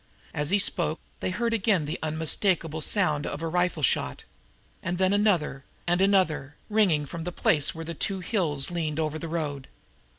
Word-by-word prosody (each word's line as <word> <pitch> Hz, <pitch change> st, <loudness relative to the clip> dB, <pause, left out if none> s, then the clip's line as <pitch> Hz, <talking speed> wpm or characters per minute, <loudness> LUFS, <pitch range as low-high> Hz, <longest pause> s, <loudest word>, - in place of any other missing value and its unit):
As 150 Hz, 0 st, 0 dB
he 200 Hz, -, +4 dB
spoke 175 Hz, -5 st, +1 dB, 0.2 s
they -, -, -2 dB
heard 230 Hz, +5 st, -1 dB
again 200 Hz, -7 st, +2 dB
the 150 Hz, -, -4 dB
unmistakable 160 Hz, +1 st, +1 dB
sound 150 Hz, -6 st, +1 dB
of 145 Hz, +3 st, -5 dB
a -, -, -1 dB
rifle 175 Hz, -2 st, 0 dB
shot, -, -, +1 dB, 0.6 s
and 175 Hz, +1 st, -2 dB
then 190 Hz, +1 st, +2 dB
another 180 Hz, -10 st, +1 dB, 0.2 s
and 175 Hz, +1 st, +1 dB
another, 180 Hz, -8 st, +2 dB, 0.2 s
ringing 185 Hz, -9 st, +3 dB
from 165 Hz, +4 st, -6 dB
the 180 Hz, -, -4 dB
place 150 Hz, -3 st, +2 dB
where 165 Hz, 0 st, -6 dB
the 170 Hz, -, -5 dB
two 195 Hz, +4 st, -2 dB
hills 170 Hz, -7 st, +1 dB
leaned 160 Hz, -3 st, -2 dB
over 155 Hz, 0 st, -1 dB
the 165 Hz, -, -5 dB
road. 150 Hz, -5 st, -3 dB
165 Hz, 175 wpm, -27 LUFS, 150-185 Hz, 0.6 s, he